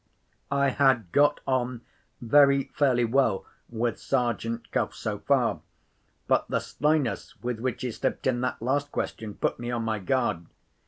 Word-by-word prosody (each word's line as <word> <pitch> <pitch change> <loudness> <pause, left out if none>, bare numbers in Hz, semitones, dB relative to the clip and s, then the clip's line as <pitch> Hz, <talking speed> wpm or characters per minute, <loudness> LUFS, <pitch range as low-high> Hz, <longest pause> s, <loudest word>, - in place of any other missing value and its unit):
I 140 0 +2
had 130 - +2
got 145 +1 +3
on 125 -2 -1 0.4
very 140 +3 +5
fairly 130 -5 +3
well 115 -5 +1 0.2
with 120 0 -2
Sergeant 120 -3 -1
Cuff - - -1
so - - -4
far. - - +1 0.7
But - - +2
the - - 0
slyness 150 -4 -1
with 120 -2 -2
which 130 +1 -3
he 125 - -1
slipped - - -3
in 125 -2 +1
that 125 -2 -2
last 145 +3 0
question 110 -2 -4
put - - -1
me 120 0 -4
on 120 -1 -1
my 110 -1 -1
guard. 95 -5 -1
125 Hz, 155 wpm, -27 LUFS, 115-135 Hz, 0.7 s, very